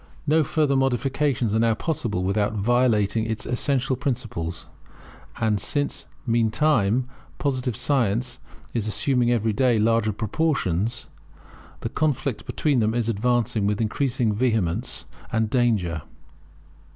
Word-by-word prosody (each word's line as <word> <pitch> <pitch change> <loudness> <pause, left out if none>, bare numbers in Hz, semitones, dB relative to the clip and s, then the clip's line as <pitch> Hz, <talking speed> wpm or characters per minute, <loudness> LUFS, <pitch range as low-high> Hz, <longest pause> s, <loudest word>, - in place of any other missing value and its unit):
No 155 +1 +4
further 150 -1 +1
modifications 135 -2 +1
are 110 - +2
now 115 -1 +3
possible 115 - -2
without 105 +3 +1
violating 110 0 +2
its 110 -1 -3
essential 130 +1 0
principles; 120 - -3 0.7
and 110 -3 +1
since, 145 +6 -2 0.2
meantime, 115 0 +2 0.3
Positive 130 -4 -1
science 125 -2 0 0.3
is 110 -3 -1
assuming 120 +4 +1
every 115 -2 +1
day 125 +1 +3
larger 110 0 +2
proportions, 110 - -1 0.7
the 115 - -3
conflict 140 -4 -1
between 145 -5 +1
them 110 0 +1
is 120 -1 0
advancing 115 -1 +1
with 105 0 0
increasing 120 0 0
vehemence 110 -2 -1 0.3
and 110 -1 0
danger. 105 - +1
115 Hz, 115 wpm, -24 LUFS, 110-130 Hz, 0.7 s, No